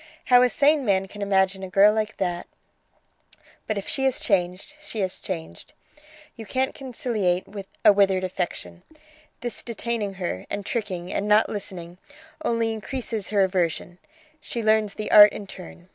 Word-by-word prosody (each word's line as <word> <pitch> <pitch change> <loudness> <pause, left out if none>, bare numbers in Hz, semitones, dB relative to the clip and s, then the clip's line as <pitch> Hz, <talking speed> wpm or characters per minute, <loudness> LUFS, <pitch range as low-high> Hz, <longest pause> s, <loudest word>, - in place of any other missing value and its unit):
How 245 -1 +6
a 250 - +4
sane 290 +2 +3
man 195 -4 +1
can 205 +2 -10
imagine 190 -1 +1
a 190 - -6
girl 200 +2 +5
like 220 0 -2
that...! 175 -2 -2 1.2
But 215 - -1
if 200 - -5
she 275 -4 -1
has 265 -1 +1
changed, 185 +5 -1
she 230 -7 -6
has 185 -1 -3
changed! 165 -4 -7 0.6
You 225 - -8
can't 260 +5 -1
conciliate 225 -8 -2 0.4
a - - +9
withered 195 -2 +3
affection. 180 -1 -4 0.6
This 240 -1 -4
detaining 230 -3 -3
her, 175 - -4
and 205 -1 -4
tricking, 190 -7 -4
and 205 - -1
not 210 +1 +4
listening, 180 -3 -6 0.4
only 230 -4 0
increases 225 -1 -4
her 205 -2 +3
aversion; 180 -1 -1 0.4
she 235 -5 -5
learns 215 -1 +2
the 215 - -4
art 210 -1 +9
in 205 - -7
turn. 180 -2 -12
205 Hz, 160 wpm, -24 LUFS, 185-225 Hz, 1.2 s, a